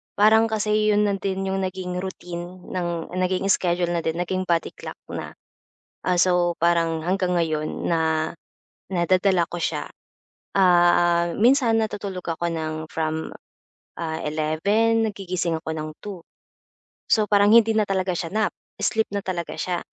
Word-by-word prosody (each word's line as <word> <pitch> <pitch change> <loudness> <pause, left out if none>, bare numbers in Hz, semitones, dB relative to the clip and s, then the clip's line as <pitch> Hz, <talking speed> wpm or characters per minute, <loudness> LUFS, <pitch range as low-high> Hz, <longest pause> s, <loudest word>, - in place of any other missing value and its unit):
parang 220 +2 +5
kasi 215 0 +2
'yon 210 - +3
na 200 - +1
din 195 0 -2
'yong 195 0 -1
naging 185 -1 -3
routine 180 -1 -7
nang 175 -2 -3
naging 185 +1 0
schedule 175 -2 +1
na 170 - 0
din 160 0 -1
naging 185 +1 -1
body 170 -1 +1
clock - - -8 0.2
na. - - -6 0.7
Ah, 180 - +3
so, 175 -1 +3
parang 165 -1 +2
hanggang 185 -1 0
ngayon 155 -2 -1
na, 160 -1 +1 0.6
nadadala 185 +1 +3
ko 175 - -4
siya, - - -2 0.7
ah, 175 -2 +4
minsan 240 +1 +4
natutulog 200 -4 -4
ako 170 +1 -1
ng 160 -1 -3 0.2
from 160 0 -2 0.7
ah, 160 -1 -3
11:00 200 +10 +1
nagigising 185 -4 -2
ako 160 - -8
ng 155 0 -4
2:00 195 -5 -7 0.9
So 215 -1 +4
parang 205 0 +5
hindi 225 -1 +6
na 215 - +3
talaga 190 -1 0
siya 165 -1 -3
nap, 215 -1 +1 0.3
sleep 220 0 +1
na 200 - -1
talaga 175 -3 -3
siya. 175 -1 -1
180 Hz, 150 wpm, -23 LUFS, 170-200 Hz, 0.9 s, hindi